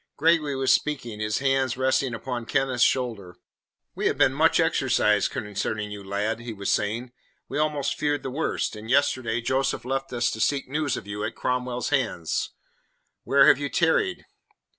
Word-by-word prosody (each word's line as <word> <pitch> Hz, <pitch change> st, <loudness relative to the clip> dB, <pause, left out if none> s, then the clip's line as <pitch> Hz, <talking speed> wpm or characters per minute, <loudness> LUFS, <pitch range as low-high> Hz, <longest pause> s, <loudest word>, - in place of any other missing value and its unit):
Gregory 155 Hz, -2 st, +2 dB
was 135 Hz, 0 st, +3 dB
speaking, 120 Hz, -8 st, -2 dB
his 110 Hz, 0 st, -1 dB
hands 135 Hz, -2 st, +1 dB
resting 130 Hz, -1 st, +1 dB
upon 120 Hz, 0 st, -4 dB
Kenneth's 130 Hz, -2 st, +1 dB
shoulder. 105 Hz, -9 st, -1 dB, 0.6 s
"We -, -, -1 dB
have -, -, 0 dB
been -, -, +4 dB
much -, -, +3 dB
exercised 105 Hz, -1 st, +2 dB
concerning 105 Hz, -2 st, -3 dB
you, 100 Hz, -1 st, -7 dB
lad," 105 Hz, +3 st, -2 dB
he 115 Hz, 0 st, -6 dB
was 100 Hz, -1 st, -2 dB
saying. 115 Hz, +4 st, -1 dB, 0.4 s
"We 145 Hz, -, -3 dB
almost 150 Hz, -2 st, 0 dB
feared 145 Hz, -1 st, 0 dB
the 130 Hz, -, -4 dB
worst, 150 Hz, -4 st, -2 dB
and 105 Hz, +1 st, -9 dB
yesterday 130 Hz, -4 st, +1 dB
Joseph 130 Hz, +1 st, -1 dB
left 135 Hz, +1 st, -2 dB
us 120 Hz, -1 st, 0 dB
to 110 Hz, -, -6 dB
seek 140 Hz, +4 st, 0 dB
news 145 Hz, +1 st, -1 dB
of -, -, -7 dB
you 105 Hz, +1 st, -5 dB
at 115 Hz, -, -3 dB
Cromwell's 125 Hz, -1 st, -2 dB
hands. 120 Hz, -, -1 dB, 0.8 s
Where 140 Hz, 0 st, +5 dB
have -, -, +6 dB
you 145 Hz, 0 st, -2 dB
tarried?" 170 Hz, -, +1 dB
125 Hz, 170 wpm, -25 LUFS, 110-135 Hz, 0.8 s, have